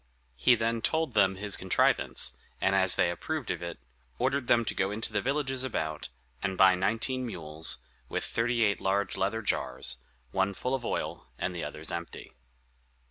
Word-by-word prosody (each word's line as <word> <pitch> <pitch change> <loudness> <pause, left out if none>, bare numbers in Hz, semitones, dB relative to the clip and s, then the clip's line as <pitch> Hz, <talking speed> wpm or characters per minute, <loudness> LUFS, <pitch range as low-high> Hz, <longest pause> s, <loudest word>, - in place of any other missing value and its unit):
He 90 - +5
then 115 0 -1
told 160 +6 0
them 95 -2 +4
his 100 +1 +2
contrivance; 90 -8 +2 0.2
and 95 - +2
as 95 -2 +5
they 85 - +3
approved 150 - -3
of - - -4
it, 85 -1 -5 0.4
ordered 130 0 0
them 115 -1 +4
to - - -1
go 95 0 0
into 110 +1 -3
the 100 - +1
villages 135 0 0
about, 80 - -3 0.3
and 95 -1 -2
buy 95 -1 +7
nineteen 115 +8 0
mules, 80 -8 0 0.3
with - - -1
thirty 115 0 +1
eight 100 -2 +1
large 100 +1 0
leather 105 +4 -1
jars, 65 - 0 0.3
one 95 +4 0
full 125 +6 -2
of 130 -2 -1
oil, - - -3
and 90 - -2
the 85 - -4
others 75 +1 -4
empty. 85 -4 -6
100 Hz, 175 wpm, -29 LUFS, 90-120 Hz, 0.4 s, buy